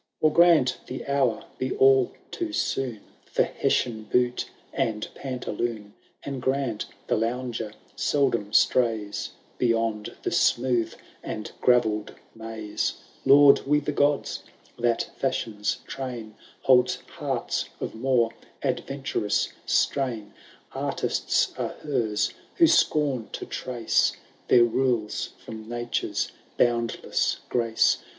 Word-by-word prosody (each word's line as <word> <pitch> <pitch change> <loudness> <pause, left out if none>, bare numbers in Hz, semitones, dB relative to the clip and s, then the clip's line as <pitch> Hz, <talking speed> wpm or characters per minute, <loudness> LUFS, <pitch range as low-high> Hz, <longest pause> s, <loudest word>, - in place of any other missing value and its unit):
II. 155 - +7
Or - - -8
grant 170 -7 +5
the 130 - -6
hour 135 -5 +1
be 130 0 -1
all 135 -1 +5 0.2
too 335 -2 -3
soon 130 - -1 0.3
For - - +2
Hessian 110 -3 0
boot 125 +2 +1 0.2
and 105 -2 -1
pantaloon. 120 -5 -4 0.3
And 140 -2 -4
grant 130 -4 -1 0.2
the - - +1
lounger 115 -1 -2 0.2
seldom 120 -8 +1
strays 110 -5 +2 0.3
Beyond 115 -3 0
the - - -1
smooth 120 -2 +2 0.3
and 110 - -5
gravelled 110 -4 +2 0.2
maze, 110 -1 -3 0.3
Laud 140 0 +8
we 150 +1 +4
the 150 0 -2
gods, 145 0 +1 0.4
that 120 -1 +1
Fashion^s 110 -6 -1
train 120 -5 -6 0.3
Holds 125 -2 +5 0.2
hearts - - -2
of - - -4
more 120 -1 +2 0.3
adyenturous 135 -6 -1
strain. 120 -7 0 0.4
Artists - - 0
are - - -2
hers, 110 -8 0 0.2
who 340 - +6
scorn 150 - +2
to - - -4
trace 120 -3 +1 0.3
Their 120 - +7
rules 120 -2 0
from 110 0 -8
Nature's 120 0 -2 0.3
boimdless 120 -2 +1
grace. 115 -2 +2
120 Hz, 110 wpm, -26 LUFS, 110-135 Hz, 0.4 s, Laud